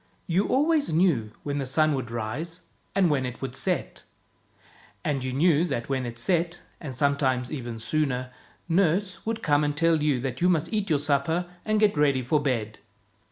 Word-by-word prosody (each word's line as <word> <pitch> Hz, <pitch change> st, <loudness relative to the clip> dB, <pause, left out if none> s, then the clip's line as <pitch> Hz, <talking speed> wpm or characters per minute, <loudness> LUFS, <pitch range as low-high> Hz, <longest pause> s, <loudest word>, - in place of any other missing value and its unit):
You 180 Hz, +4 st, +1 dB
always 295 Hz, -, +2 dB
knew 155 Hz, -, +2 dB
when 145 Hz, 0 st, -2 dB
the 135 Hz, -, -2 dB
sun 155 Hz, +3 st, +3 dB
would 130 Hz, -4 st, -3 dB
rise, 120 Hz, +10 st, -4 dB, 0.3 s
and 195 Hz, -2 st, +4 dB
when 145 Hz, -4 st, +1 dB
it 125 Hz, -1 st, -5 dB
would 135 Hz, -, -5 dB
set; -, -, -2 dB, 1.0 s
and 140 Hz, -3 st, 0 dB
you 130 Hz, -, -2 dB
knew 155 Hz, +3 st, +3 dB
that 135 Hz, -8 st, -3 dB
when 130 Hz, -2 st, -1 dB
it 120 Hz, 0 st, -7 dB
set 170 Hz, +6 st, 0 dB
— -, -, -35 dB
and 140 Hz, -6 st, -6 dB
sometimes 130 Hz, -2 st, +1 dB
even 120 Hz, -6 st, -5 dB
sooner 125 Hz, +1 st, -1 dB, 0.2 s
— -, -, -34 dB
nurse 185 Hz, +2 st, 0 dB
would 225 Hz, 0 st, -2 dB
come 145 Hz, 0 st, +3 dB
and 145 Hz, 0 st, -1 dB
tell 165 Hz, -1 st, +3 dB
you 145 Hz, -4 st, +2 dB
that 130 Hz, +1 st, -4 dB
you 180 Hz, -, +4 dB
must 165 Hz, 0 st, +1 dB
eat 210 Hz, -2 st, 0 dB
your 155 Hz, -, +3 dB
supper 145 Hz, +4 st, +1 dB, 0.2 s
and 215 Hz, 0 st, +2 dB
get 210 Hz, -3 st, +3 dB
ready 140 Hz, -3 st, +3 dB
for 150 Hz, +5 st, +2 dB
bed. 115 Hz, -6 st, -2 dB
145 Hz, 195 wpm, -26 LUFS, 130-170 Hz, 1.0 s, and